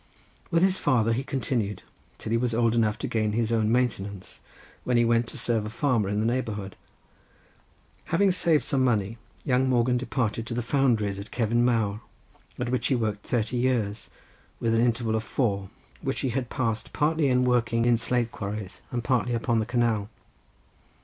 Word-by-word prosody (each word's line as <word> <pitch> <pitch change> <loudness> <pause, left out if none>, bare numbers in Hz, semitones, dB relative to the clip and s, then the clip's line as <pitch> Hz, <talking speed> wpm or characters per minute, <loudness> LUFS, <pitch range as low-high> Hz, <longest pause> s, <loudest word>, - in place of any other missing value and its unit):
With 165 +1 +3
his 190 0 +3
father 115 -5 +2
he 125 +4 -1
continued 120 -7 -2 0.3
till 110 - -6
he 115 - +3
was 120 -2 0
old 115 -1 +2
enough 110 -2 +2
to - - -4
gain 110 -2 0
his 115 0 0
own 110 -1 +2
maintenance, 100 -6 -2 0.4
when 125 -1 +1
he 120 - +4
went 115 0 +2
to - - -9
serve 115 -3 0
a 105 - -5
farmer 115 -4 0
in 105 +1 0
the 110 - 0
neighbourhood. 110 -5 -2 1.3
Having 195 +3 +3
saved 170 -4 +2
some 135 -2 +1
money, 115 -2 0 0.3
young 130 -2 +2
Morgan 125 0 +2
departed 115 -3 -2
to 115 - -4
the 120 - -1
foundries 115 -6 +1
at 100 - -8
Cefn 120 0 +1
Mawr, 110 -3 +1 0.6
at 125 -1 -2
which 130 0 0
he 130 - +2
worked 105 -3 -2
thirty 120 0 0
years, 115 -5 -1 0.5
with 115 -1 +1
an 115 - +3
interval 115 -2 +1
of 110 0 0
four, 100 -6 -1 0.3
which 135 -1 -2
he 135 - 0
had 125 0 -2
passed 115 -3 -2
partly 150 -2 +2
working 120 -2 +2
in 120 -1 +5
slate 120 0 0
quarries, 100 -1 -6
and 120 -1 -3
partly 125 -1 +1
upon 115 0 +1
the 110 - -2
canal. 115 -4 0
115 Hz, 180 wpm, -26 LUFS, 110-125 Hz, 1.3 s, in